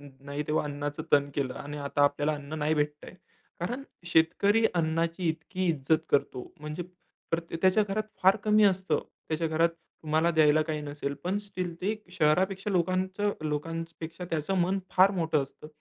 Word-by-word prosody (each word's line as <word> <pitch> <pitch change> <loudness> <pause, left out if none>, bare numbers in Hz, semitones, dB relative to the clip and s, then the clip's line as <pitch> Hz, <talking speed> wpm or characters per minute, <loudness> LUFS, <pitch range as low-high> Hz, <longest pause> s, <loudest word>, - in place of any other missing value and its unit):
नाही 140 +1 -6
तेव्हा 150 0 +1
अन्नाचं 145 +1 -4
तण 140 0 +5
केलं 130 -3 -1
आणि 145 +1 -7
आता 145 0 0
आपल्याला 145 +2 +2
अन्न 145 +2 -6
नाही 150 +1 +1
भेटतंय. 150 +2 -2 0.5
कारण 245 +10 -3 0.2
शेतकरी 180 +7 +3
अन्नाची 165 +1 0
इतकी 175 +4 -2
इज्जत 155 0 +2
करतो. 130 -3 0
म्हणजे 150 +3 -4 0.5
प्रते 165 0 -2
त्याच्या 190 +3 +5
घरात 205 +2 0 0.2
फार 190 +3 +6
कमी 215 0 +5
असतं. 190 -1 +2 0.3
त्याच्या 160 +1 0
घरात 165 +2 +3 0.3
तुम्हाला 155 +2 +2
द्यायला 155 -1 +5
काही 155 -1 -3
नसेल. 145 -1 -4
पण 190 +3 0
स्टिल 185 -4 -5
ते 205 +4 0 0.2
शहरापेक्षा 185 +5 +1
लोकांचं 185 +3 +1 0.2
लोकांपेक्षा 165 +3 -4
त्याचं 160 +4 -1
मन 190 +3 +1
फार 190 +2 +6
मोठं 165 -6 +1
असतं. 135 +2 -11
165 Hz, 155 wpm, -29 LUFS, 150-185 Hz, 0.5 s, फार